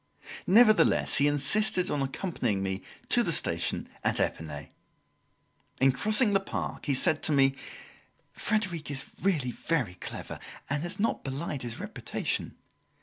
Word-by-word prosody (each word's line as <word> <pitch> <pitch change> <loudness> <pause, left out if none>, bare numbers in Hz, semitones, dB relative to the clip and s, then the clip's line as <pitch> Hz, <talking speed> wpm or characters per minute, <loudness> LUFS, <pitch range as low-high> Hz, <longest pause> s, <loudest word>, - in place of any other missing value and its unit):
Nevertheless 215 +2 +5
he 145 - +4
insisted 180 +7 +3
on 145 - -1
accompanying 135 - -2
me 95 0 -3 0.3
to - - +4
the - - -1
station - - 0 0.2
at - - +1
Epinay. 75 -3 -3 1.1
In 135 +1 +5
crossing 210 - +2
the 195 - +4
park, 195 - -5
he 140 - +2
said 155 +4 +2
to - - +1
me: 135 -2 +4 0.8
"Frederic 185 -9 -1
is 135 -2 -3 0.2
really 155 -10 +1
very 130 - -1
clever 90 - -7 0.3
and 145 +1 0
has 175 +4 -2
not 225 - 0
belied 140 +1 -4
his 120 -2 -5
reputation. - - -4
145 Hz, 140 wpm, -28 LUFS, 130-195 Hz, 1.1 s, Nevertheless